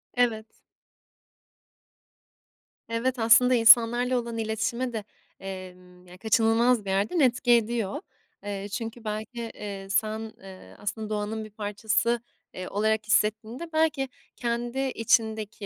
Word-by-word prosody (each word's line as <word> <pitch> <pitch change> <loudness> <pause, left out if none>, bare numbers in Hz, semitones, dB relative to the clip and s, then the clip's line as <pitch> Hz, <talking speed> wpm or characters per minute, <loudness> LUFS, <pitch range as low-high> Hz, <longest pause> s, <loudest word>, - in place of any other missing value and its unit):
Evet. 235 -3 +1 2.4
Evet, 240 +3 -1
aslında 245 +3 +6
insanlarla 240 +2 +6
olan 235 -1 -5
iletişime 225 +3 -2
de, 220 - -3 0.4
emm, 180 -1 -10
ya, 180 +1 -13
kaçınılmaz 225 +2 +2
bir - - -4
yerden 200 - 0
etki 250 -3 +3
ediyor. 230 -3 +1 0.4
Eee, 200 0 -4
çünkü 225 +2 -5
belki, 215 +3 -5
eee, 195 -2 -7
sen, 220 +2 -1
eee, 190 -1 -13
aslında 215 +1 -4
doğanın 215 +1 -3
bir 215 - -11
parçası, 215 +3 -1 0.3
eee, 185 0 -6
olarak 215 +1 0
hissettiğinde 220 +8 0
belki 305 -4 +1 0.3
kendi 240 +2 -2 0.2
içindeki, 220 -2 0
220 Hz, 115 wpm, -26 LUFS, 205-235 Hz, 2.4 s, aslında